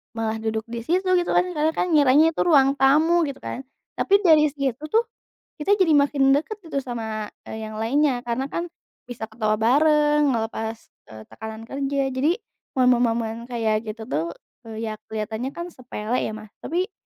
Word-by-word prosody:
malah 225 -1 -2
duduk 220 0 -2
di 235 0 -4
situ 365 +3 +1
gitu 350 0 0
kan - - +4
karena 315 -1 +1
kan 360 - 0
ngiranya 295 +1 +5
tuh - - +1
ruang 275 -2 +5
tamu 310 +6 +4
gitu 280 - -6
kan. 255 - -5 0.4
Tapi 400 0 +4
dari 310 -4 +6
situ 270 -4 -2
tuh 450 +9 +3 0.6
kita 405 +7 +3
jadi 355 -4 +4
makin 280 -1 +3
deket 325 +9 -3
gitu 280 -3 -2
sama, 220 -4 -4 0.2
eee, 220 - -6
yang 215 0 -7
lainnya, 260 +2 +2
karena 250 +3 -2
kan 340 - -2 0.4
bisa 240 -2 -6
ketawa 215 -1 0
bareng, 295 +4 +3
ngelepas, 225 0 -3 0.4
eee, 110 0 -10
tekanan 220 0 -8
kerja. 275 +2 -2
Jadi 285 +7 +1 0.4
momen-momen 235 -2 +2
kayak 225 -2 -1
gitu 220 +1 -6
tuh, 165 +3 -2 0.3
eee, 225 0 -5
ya 215 - -6
kelihatannya 220 +4 -3
kan 345 +1 -6
sepele 245 -4 -4
ya 220 - -2
Mas, 215 -1 -10
tapi 365 +5 -2
255 Hz, 170 wpm, -23 LUFS, 220-300 Hz, 0.6 s, dari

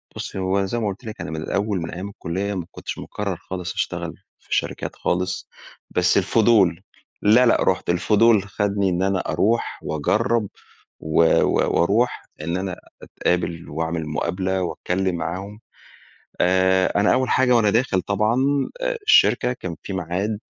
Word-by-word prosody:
بُصّي - - -6
هو 95 +1 +1
زي 120 +5 -2
ما 110 - -1
قُلت 100 +5 -5
لِك، 110 +1 -7
أنا - - -5
من 80 - -4
الأوّل 100 +2 -1
من 85 - -5
أيّام 95 +3 -6
الكلية 100 +1 -3
ما 90 -4 -4
كنتش - - -7
مقرر 100 -3 -4
خالص 90 +1 -6
أشتغل - - -3 0.3
في - - -3
شركات - - -3
خالص، 90 +1 -2 0.4
بس 90 +2 +2
الفضول 100 -3 +3 0.4
لا 110 +5 +5
لا، 120 - +3
رُحت - - 0
الفضول 105 +4 +4
خدني 100 -1 0
إن 90 +1 0
أنا 95 -1 +1
أروح 115 +5 0
وأجرّب، 110 - 0 0.5
و 80 +1 +1 0.2
و - - +1
وأروح 110 +8 +1 0.2
إن 85 +3 -2
أنا 95 -1 -3 0.3
أتقابل 85 -1 -2
وأعمل 80 +1 -3
مقابلة 95 +4 -1
وأتكلّم 90 +1 -1
معاهم. 95 +5 -5 0.8
آآ 95 +1 +3
أنا 105 - +4
أوّل 130 0 +1
حاجة 125 -2 +4
وأنا 110 -3 +4
داخل 110 -3 +1
طبعًا 105 +5 +1 0.7
الشركة، 125 - +5
كان 90 -8 -6
في 100 - -5
ميعاد 95 +4 -2
95 Hz, 150 wpm, -22 LUFS, 90-105 Hz, 0.8 s, لا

